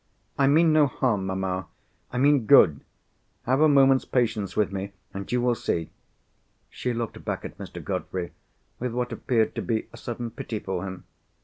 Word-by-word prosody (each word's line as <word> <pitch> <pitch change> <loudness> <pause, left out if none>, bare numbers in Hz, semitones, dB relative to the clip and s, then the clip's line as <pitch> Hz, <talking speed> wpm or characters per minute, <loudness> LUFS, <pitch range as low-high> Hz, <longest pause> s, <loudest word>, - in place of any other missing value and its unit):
"I 140 - +3
mean 160 +3 +5
no 155 -2 +5
harm, 110 -7 0
mamma—I 95 +5 -5
mean 140 -3 +3
good. 85 - +6 0.6
Have 130 +4 +1
a 155 - +7
moment's 135 -2 +5
patience 110 -5 -1
with 105 -1 +2
me, 100 0 -5 0.2
and 100 0 -6
you 125 - +2
will 125 0 +2
see." 85 -7 -2 0.8
She 125 - -3
looked 115 -2 -4
back - - -3
at - - -9
Mr. - - -8
Godfrey, 90 -2 -3 0.5
with 125 -1 -3
what 125 0 -2
appeared 115 -3 0
to - - -3
be 110 -2 -1
a - - -10
sudden 120 -1 -5
pity 110 -1 -5
for 95 -3 -4
him. 95 -1 -8
115 Hz, 175 wpm, -26 LUFS, 95-130 Hz, 0.8 s, a